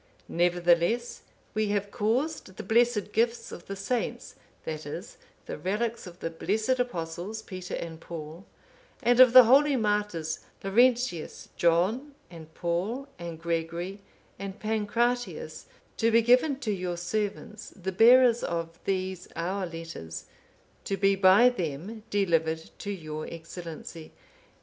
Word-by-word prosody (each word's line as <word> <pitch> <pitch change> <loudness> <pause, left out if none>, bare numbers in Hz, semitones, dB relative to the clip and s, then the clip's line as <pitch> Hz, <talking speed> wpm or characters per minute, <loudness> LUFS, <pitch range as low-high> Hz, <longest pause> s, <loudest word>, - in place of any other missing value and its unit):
Nevertheless, 175 +6 +2 0.3
we 215 0 0
have 205 0 -1
caused 235 - -1
the - - -5
blessed 225 -1 +2
gifts 230 +2 0
of 170 - -10
the 195 - -4
saints, 225 +5 -3 0.3
that 155 -1 -4
is, 175 +8 -7 0.3
the - - -6
relics 215 +3 -2
of 175 0 -12
the 165 - -3
blessed 220 +9 0
Apostles, 185 -1 -3
Peter 185 -1 -6
and 165 -1 -6
Paul, 165 +1 -8 0.6
and 240 +1 +3
of 255 -2 +9
the 255 +1 +11
holy 275 +4 +5
martyrs, 205 -8 -1 0.2
Laurentius, 235 -3 +1
John, 195 - +1 0.2
and 160 -2 -11
Paul, 195 +11 -2
and 170 -2 -6
Gregory, 170 +3 -3 0.4
and 195 0 -6
Pancratius,(509) 240 - -2
to 230 - +3
be 230 0 +5
given 255 +4 +4
to 225 -6 -1
your 180 -3 -3
servants, 210 +3 -3
the 190 -1 -5
bearers 240 +4 +6
of 165 0 -3
these 185 -1 -2
our 185 +3 -2
letters, 165 - -7 0.6
to 195 - -1
be 195 0 +3
by 195 +5 +6
them 185 - -3
delivered 165 -5 0
to 205 - -6
your 155 -5 -5
Excellency. 165 -1 -9
195 Hz, 130 wpm, -28 LUFS, 170-230 Hz, 0.6 s, the